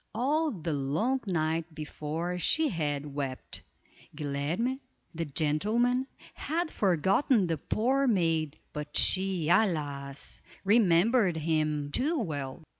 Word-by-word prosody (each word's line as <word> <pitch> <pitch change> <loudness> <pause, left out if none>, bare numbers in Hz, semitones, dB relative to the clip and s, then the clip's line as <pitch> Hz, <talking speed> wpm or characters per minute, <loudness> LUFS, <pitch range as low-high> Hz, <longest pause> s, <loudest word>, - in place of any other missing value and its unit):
All 300 +7 +1
the 170 - -3
long 155 - 0
night 160 -2 -1
before 160 +3 -4
she 315 - +3
had 150 - -2
wept. 135 -2 -4 0.5
Guilerme, 150 - -2 0.3
the 165 0 -3
gentleman, 215 - +1 0.3
had 325 +2 -2
forgotten 195 - +2
the 165 -2 -1
poor 265 - +1
maid; 165 - +1 0.2
but 150 0 -4
she, 190 -4 +3
alas! 145 -8 0 0.2
remembered 200 -1 +4
him 155 -2 0
too 295 - +1
well. 145 - -4
170 Hz, 110 wpm, -29 LUFS, 150-230 Hz, 0.5 s, remembered